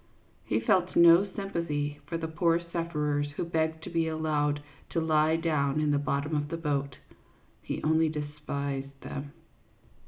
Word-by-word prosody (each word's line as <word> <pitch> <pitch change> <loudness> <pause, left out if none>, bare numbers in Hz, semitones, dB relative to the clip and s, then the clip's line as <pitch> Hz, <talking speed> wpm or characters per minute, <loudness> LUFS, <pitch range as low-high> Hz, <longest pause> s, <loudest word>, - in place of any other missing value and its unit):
He 110 - +1
felt 180 +10 +2
no 170 +3 +7
sympathy 150 -7 -2
for 165 - -2
the 165 -1 -3
poor 165 +1 +2
sufferers 150 -4 -1
who - - -1
begged 160 -1 -1
to - - -7
be 165 -1 +1
allowed 150 -2 0 0.3
to - - 0
lie 155 0 +3
down 150 -3 +1
in 150 -1 +2
the 145 - +2
bottom 145 +2 -1
of 145 0 0
the 165 - -3
boat; 140 -4 -2 0.6
he - - -4
only 160 +1 +3
despised 140 -2 -4
them. 140 +1 -6
155 Hz, 155 wpm, -29 LUFS, 145-165 Hz, 0.6 s, no